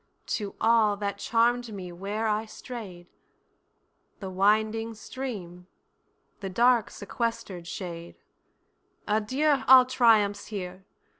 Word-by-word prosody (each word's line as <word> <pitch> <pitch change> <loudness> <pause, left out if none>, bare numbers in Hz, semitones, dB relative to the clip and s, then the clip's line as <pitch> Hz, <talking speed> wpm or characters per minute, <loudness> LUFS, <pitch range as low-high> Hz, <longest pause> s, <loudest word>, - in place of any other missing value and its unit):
To 205 -2 -6
all, 220 -2 +3
that 200 0 -3
charm'd 235 +1 +1
me 185 -3 -7
where 200 +5 -4
I 215 +1 0
stray'd, 205 -7 -9 1.1
The 190 -2 -6
winding 220 +4 +1
stream, 205 -7 -7 0.7
the 195 - -5
dark 235 +3 +3
sequester'd 200 -5 -4
shade; 170 -2 -7 0.9
Adieu 260 +7 +1
all 260 -1 +9
triumphs 220 -5 +3
here! 190 -2 -7
210 Hz, 100 wpm, -27 LUFS, 190-230 Hz, 1.1 s, all